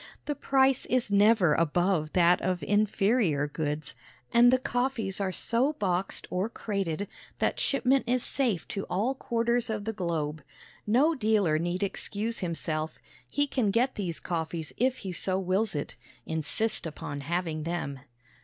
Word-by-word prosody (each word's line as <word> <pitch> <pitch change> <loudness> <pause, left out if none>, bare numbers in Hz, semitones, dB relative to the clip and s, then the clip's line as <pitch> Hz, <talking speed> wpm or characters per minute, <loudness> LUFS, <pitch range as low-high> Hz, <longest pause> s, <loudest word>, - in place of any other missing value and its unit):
The 295 - -1
price 270 -1 +2
is 245 -4 +1
never 205 -5 +5
above 170 0 +1
that 175 0 +4
of 180 -3 -1
inferior 205 - +2
goods, 150 -1 -3 0.4
and 240 +1 +7
the 255 - +5
coffees 245 -6 -1
are 190 -1 0
so 235 +9 +1
boxed 190 -6 -1
or 185 +4 0
crated 200 -5 -3 0.3
that - - 0
shipment 270 -2 +2
is 250 0 +2
safe 240 -10 0
to 195 - -2
all 215 +9 0
quarters 235 -2 0
of 210 -2 -3
the 225 - -2
globe. 160 -6 -2 0.5
No 270 +10 +4
dealer 210 - +2
need 175 +3 -1
excuse 210 +3 -2
himself. 160 -3 -3 0.3
He 285 - +2
can 255 -6 0
get 240 +6 +2
these 180 -6 -4
coffees 165 -2 -3
if 255 +2 +1
he 190 - -2
so 185 +2 -1
wills 190 +1 0
it. 145 - -4 0.3
Insist 165 +6 -1
upon 145 -2 -6
having 165 +1 -2
them. 155 -4 -3
195 Hz, 150 wpm, -28 LUFS, 170-235 Hz, 0.5 s, and